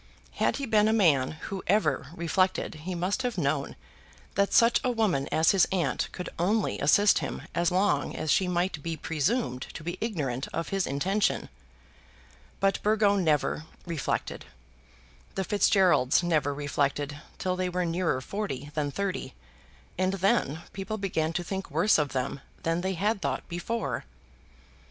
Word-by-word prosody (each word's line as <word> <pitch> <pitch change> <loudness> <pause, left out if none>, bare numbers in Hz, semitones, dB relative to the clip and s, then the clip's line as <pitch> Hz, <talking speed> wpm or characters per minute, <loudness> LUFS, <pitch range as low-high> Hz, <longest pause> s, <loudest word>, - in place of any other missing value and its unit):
Had - - +2
he 275 - -3
been 215 -3 +3
a 220 - +3
man 155 -12 +3
who 195 -2 -5
ever 155 -9 +2
reflected 180 +2 0 0.2
he 185 - -2
must 185 +8 -1
have 245 -4 -2
known 140 -3 -1 0.6
that 200 +1 +1
such 230 0 +5
a 255 - +1
woman 210 - +1
as 160 +1 +4
his 195 -3 +4
aunt 185 -3 0
could 180 - -6
only 205 +4 +1
assist 200 +8 +5
him - - -5
as 170 0 +2
long 190 +3 +1
as 155 - -1
she 185 - +3
might 175 -3 -1
be 165 +1 -4
presumed 155 - -1
to 155 - -7
be 175 +3 -4
ignorant 145 - -2
of 165 - -3
his 195 -2 0
intention. 190 +9 0 1.1
But 195 0 +1
Burgo 210 -1 +3
never 155 -4 +1 0.2
reflected. 165 -5 -3 0.9
The 190 - 0
Fitzgeralds 185 -7 +3
never 155 -5 +1
reflected 145 0 -1 0.2
till 185 -1 -1
they 185 0 -1
were 180 0 -1
nearer 165 -5 0
forty 145 -6 -4
than 145 -1 -1
thirty, 185 -5 -3 0.6
and 185 +1 +2
then 190 - +1
people 200 +3 -4
began 165 -6 -1
to 175 - -1
think 190 +2 -4
worse 210 -5 +3
of 150 -1 +1
them 135 +1 -2 0.2
than 165 +1 0
they 190 +1 -1
had 200 +3 0
thought - - -2
before. 185 - -3
180 Hz, 155 wpm, -28 LUFS, 150-200 Hz, 1.1 s, such